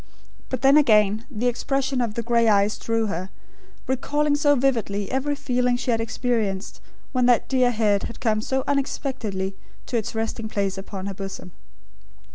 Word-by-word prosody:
But 260 0 -4
then 275 +2 +7
again, 215 -4 +4
the 240 -3 -3
expression 265 +2 0
of 225 -3 -2
the 235 - -2
grey 235 0 +2
eyes 205 0 +3
drew 225 -1 0
her, 185 -2 -3 0.6
recalling 290 +3 +1
so 290 0 +4
vividly 225 -7 0
every 280 +2 0
feeling 250 -2 0
she 250 0 -1
had 225 -1 +1
experienced 225 -4 -2 0.3
when 250 -2 +2
that 245 -2 +3
dear 255 -2 +3
head 215 -4 +2
had 235 - -8
come 215 -2 +1
so 265 +3 -1
unexpectedly 235 -9 -2 0.3
to 245 - -1
its 220 0 -3
resting 225 0 -3
place 200 -2 -1
upon 195 0 -6
her 200 - -3
bosom. 195 -1 -7
230 Hz, 165 wpm, -24 LUFS, 210-260 Hz, 0.6 s, then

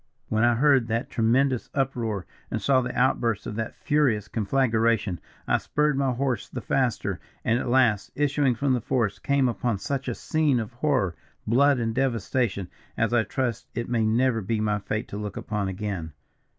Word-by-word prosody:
"When 110 +1 +1
I 120 0 +4
heard 135 -2 +4
that 115 +1 -2
tremendous 125 +3 +2
uproar, 120 -8 -1 0.2
and - - -2
saw 135 -2 +3
the 125 - -4
outburst 120 -4 +1
of - - -4
that 115 - -3
furious 130 -9 +1
conflagration, 115 -4 +1 0.3
I - - +3
spurred 150 0 +1
my 135 -1 +1
horse 130 -3 -2
the - - -5
faster, - - -1 0.3
and 115 +2 +2
at 125 - -3
last, 120 -5 +3
issuing 145 -3 +2
from 135 +2 +1
the 125 - 0
forest, 110 -4 -1
came 140 -2 +2
upon 120 -2 -1
such 135 +6 -3
a 120 - -2
scene 155 -5 +1
of 115 +1 -5
horror, 125 - 0 0.3
blood 140 +5 +4
and 115 -2 -1
devastation, 120 -5 0 0.3
as 115 +1 +1
I 120 -2 +4
trust 120 0 -2
it 120 +1 -3
may 120 -2 +1
never 115 +1 +2
be 110 +3 -1
my 105 -1 0
fate 110 +3 -3
to 100 - -5
look 105 -1 -5
upon 105 -2 -2
again. 95 -5 -4
120 Hz, 180 wpm, -26 LUFS, 110-130 Hz, 0.3 s, I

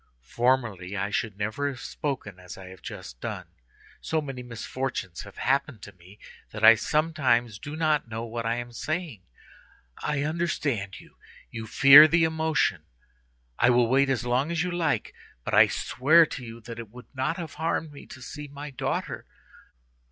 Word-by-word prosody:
Formerly 115 -7 0
I 100 +2 -2
should 105 -1 -2
never 110 +7 -2
have 135 -3 -5
spoken 130 -13 -5
as 90 -1 -10
I 95 -1 -10
have 95 -2 -13
just - - -9
done; - - -5 0.6
so 160 - -1
many 135 -4 -6
misfortunes 120 -5 -5
have 100 - -13
happened 135 -4 0
to - - -9
me, 90 +3 -17 0.3
that 110 0 -8
I 110 +1 +10
sometimes 125 -5 +1
do 150 +6 -7
not 155 -4 +1
know 115 +1 -4
what 115 0 -4
I 115 +1 0
am 120 0 -6
saying. 155 - -4 0.8
I 150 -2 -1
understand 150 - -2
you; - - -18 0.3
you 115 -1 -6
fear 140 +7 +9
the 165 +1 +3
emotion. 160 - +1 0.8
I 120 - +5
will 120 -1 +4
wait 135 +3 +3
as 125 -2 0
long 125 +5 +1
as 170 -1 0
you 180 - -2
like, 160 -10 -1 0.3
but - - -5
I - - +7
swear 155 +6 +4
to 140 -4 -7
you 115 0 -9
that 115 0 -9
it 115 -3 -8
would 125 +4 -14
not 130 +5 -1
have 165 -4 -6
harmed 160 -1 -1
me 140 - -12
to 130 - -11
see 150 +3 -8
my 145 +1 -8
daughter. 130 - -3
125 Hz, 175 wpm, -26 LUFS, 110-150 Hz, 0.8 s, I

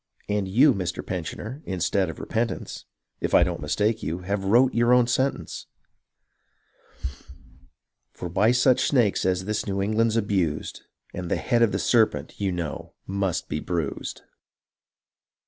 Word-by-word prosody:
And 105 -2 0
you, 130 +9 +5
Mr. 90 -4 -3
Pensioner, 95 - -5
instead 95 0 0
of 80 - -7
repentance 115 +1 -3 0.3
(If - - 0
I - - +7
don't - - -2
mistake 105 +2 0
you), 85 +3 -3
have 100 +2 -2
wrote 120 +6 +4
your 120 +1 +4
own 125 -1 +5
sentence; 130 +3 -1 2.4
For 90 - -6
by 100 +6 +3
such 125 +1 +3
sjiakcs 120 -9 +2
as 95 0 0
this 105 +1 -2
New 100 -1 -1
England's 110 +3 +1
abused 95 -8 -1 0.3
And 90 -1 -5
the - - +2
head 120 -2 +1
of 115 -3 +4
the - - 0
serpents, 105 -9 +1
you 100 -2 +1
know, 85 -4 -5
must 95 -2 -2
be 75 - -2
bruised." 85 -3 -4
100 Hz, 145 wpm, -25 LUFS, 90-115 Hz, 2.4 s, I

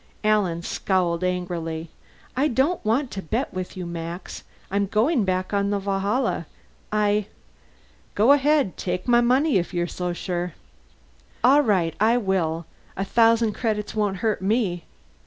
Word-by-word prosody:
Alan 200 -6 +1
scowled 180 -2 0
angrily. 170 -3 -3 0.4
"I 275 +4 +2
don't 290 +6 +1
want 245 +5 0
to 195 - -4
bet 225 - -2
with 185 0 -5
you, 180 - -4
Max. 170 +1 -6 0.3
I'm 200 0 +1
going 225 - +2
back 185 +1 -1
on 200 0 +1
the 205 - +1
Valhalla. 200 - -1 0.4
I 210 -1 +1 0.4
" - - -33
"Go 220 +6 +5
ahead. 285 -6 +3
Take 180 +2 -3
my 240 -1 +5
money, 260 +3 +3
if 175 +1 -5
you're 175 0 +1
so 180 +1 -3
sure." 175 -1 -3 0.9
"All 275 +4 +6
right, 185 - +1
I 225 +3 +4
will! 175 -7 -1 0.3
A 195 - -1
thousand 230 0 +3
credits 215 -2 -2
won't 205 -3 0
hurt 215 -3 +1
me!" 195 -4 0
200 Hz, 150 wpm, -24 LUFS, 180-230 Hz, 0.9 s, All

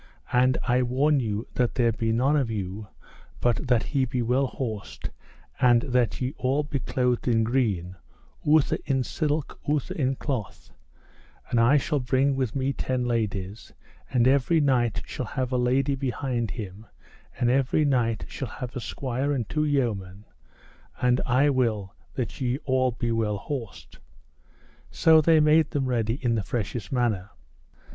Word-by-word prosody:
And 125 +1 +4
I 125 +1 +3
warn 135 +4 +2
you 110 -2 -2
that 125 -2 0
there 120 -2 +3
be 115 +1 -1
none 130 +6 +2
of 135 -6 +1
you 100 -1 -4 0.5
but 120 +3 0
that 125 -2 +3
he 140 -3 0
be 125 -1 -2
well 130 +4 +2
horsed, 110 -6 -5 0.5
and 120 -1 +5
that 125 -4 0
ye 130 +2 -2
all 135 +3 +1
be 145 -1 -3
clothed 125 -1 -1
in 115 -2 +3
green, 105 -7 0 0.5
outher 150 -1 +3
in 135 -2 +1
silk 150 +2 -2
outher 150 -3 0
in 135 -2 0
cloth; 125 -8 -5 0.8
and 120 - +2
I 120 +6 +5
shall 145 +1 0
bring 130 +2 +1
with 130 -3 -2
me 135 0 0
ten 130 -2 -2
ladies, 105 -3 -3 0.4
and 125 -1 +3
every 140 +5 +3
knight 125 -6 +1
shall 125 - -5
have 130 +2 -3
a 130 - +1
lady 130 +3 +2
behind 130 -3 -2
him, 105 -1 -7 0.5
and 120 0 +2
every 135 +3 +2
knight 120 -5 +1
shall 135 - -5
have 125 +3 -7
a - - -2
squire 130 +4 -2
and 125 -7 -1
two 150 0 0
yeomen; 105 -9 -1 0.7
and 125 0 +2
I 135 +4 +4
will 110 -7 0 0.2
that 115 -6 -4
ye 125 0 0
all 130 -1 +2
be 120 0 -2
well 110 -2 0
horsed. 115 -2 -7 0.9
So 160 -1 +5
they 160 0 +5
made 155 0 +4
them 145 -3 -1
ready 115 -3 0
in 120 -2 +2
the 110 - +1
freshest 110 0 -4
manner. 115 -7 0
125 Hz, 160 wpm, -26 LUFS, 115-135 Hz, 0.9 s, and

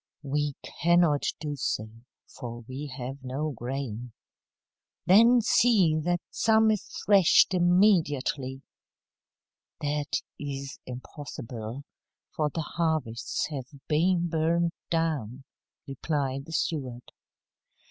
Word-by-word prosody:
"We 145 0 -1
cannot 170 -4 +2
do 150 -2 -4
so, 110 -5 -2 0.4
for 120 -1 -8
we 130 +5 -7
have 130 0 -7
no 140 +4 -2
grain." 125 -2 -5 0.9
"Then 230 +6 +6
see 210 -7 +4
that 175 +2 0
some 220 0 +4
is 210 -3 -2 0.2
threshed 195 -2 +6
immediately." 165 -8 +2 1.2
"That 145 0 -1 0.2
is 140 -1 -5
impossible, 125 -2 -7 0.5
for 150 -1 +1
the 160 +2 -3
harvests 155 -7 -1
have 135 -4 -4 0.2
been 175 +3 +2
burned 165 +1 +1 0.2
down," 145 -7 -1 0.4
replied 135 -1 -2
the 165 - -9
steward. 130 -8 -3
150 Hz, 95 wpm, -28 LUFS, 130-170 Hz, 1.2 s, Then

